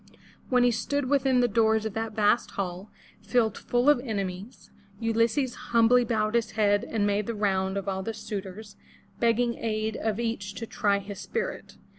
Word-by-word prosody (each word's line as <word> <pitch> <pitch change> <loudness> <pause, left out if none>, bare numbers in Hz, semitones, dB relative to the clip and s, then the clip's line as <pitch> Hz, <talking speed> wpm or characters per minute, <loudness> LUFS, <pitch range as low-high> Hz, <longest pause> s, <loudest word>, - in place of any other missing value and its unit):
When 250 -1 +4
he 245 - +4
stood 255 +4 -2
within 265 -3 +3
the 245 - +3
doors 220 0 +2
of 220 - -3
that 225 0 -3
vast 210 +2 +2
hall, 190 +1 -4 0.3
filled 225 -5 +1
full 245 +2 0
of 295 -4 +6
enemies, 200 -2 -5 0.3
Ulysses 230 +3 +1
humbly 235 +1 +3
bowed 215 -2 0
his 230 -2 0
head 205 -1 +2
and 215 -3 -1
made 205 0 0
the 230 - -3
round 190 -2 0
of 200 - -4
all 190 -1 -1
the 225 +3 -4
suitors, 205 0 -7 0.4
begging 235 0 +1
aid 220 -1 -2
of 220 -1 -2
each 225 -4 -3
to 230 - -5
try 205 -3 +1
his 200 0 -7
spirit. 465 0 -4
220 Hz, 175 wpm, -27 LUFS, 205-235 Hz, 0.4 s, of